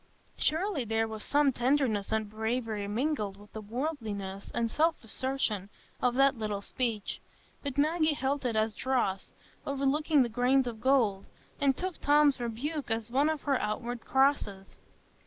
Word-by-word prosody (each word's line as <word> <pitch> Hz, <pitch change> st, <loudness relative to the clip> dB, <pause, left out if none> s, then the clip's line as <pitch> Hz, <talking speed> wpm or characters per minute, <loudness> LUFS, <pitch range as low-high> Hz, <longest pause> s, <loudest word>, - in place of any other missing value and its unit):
Surely 320 Hz, -2 st, 0 dB
there 225 Hz, 0 st, 0 dB
was 220 Hz, -1 st, -6 dB
some 290 Hz, -2 st, +3 dB
tenderness 245 Hz, -5 st, +1 dB
and 220 Hz, -1 st, 0 dB
bravery 220 Hz, -1 st, -2 dB
mingled 215 Hz, -3 st, -1 dB
with 205 Hz, +1 st, -16 dB
the 220 Hz, -, -5 dB
worldliness 215 Hz, -5 st, -4 dB
and 230 Hz, -1 st, -1 dB
self 320 Hz, +1 st, +1 dB
assertion 225 Hz, -4 st, -1 dB, 0.3 s
of 250 Hz, -1 st, +2 dB
that 275 Hz, +1 st, +4 dB
little 210 Hz, -3 st, -3 dB
speech; 230 Hz, -4 st, -3 dB, 0.4 s
but 280 Hz, -2 st, -5 dB
Maggie 310 Hz, +1 st, +2 dB
held 275 Hz, +1 st, -1 dB
it 240 Hz, -3 st, -1 dB
as 220 Hz, 0 st, +1 dB
dross, 235 Hz, -8 st, -1 dB, 0.3 s
overlooking 280 Hz, +1 st, +2 dB
the -, -, -1 dB
grains 250 Hz, +3 st, +2 dB
of 230 Hz, -2 st, -5 dB
gold, 235 Hz, -7 st, +2 dB, 0.3 s
and 275 Hz, -2 st, +2 dB
took 370 Hz, -1 st, -4 dB
Tom's 290 Hz, -1 st, +4 dB
rebuke 255 Hz, +6 st, -3 dB
as 225 Hz, 0 st, -2 dB
one 280 Hz, +4 st, +3 dB
of 310 Hz, -2 st, -2 dB
her 275 Hz, -3 st, +1 dB
outward 230 Hz, +3 st, -3 dB
crosses. 265 Hz, -8 st, +1 dB
245 Hz, 155 wpm, -30 LUFS, 220-280 Hz, 0.4 s, that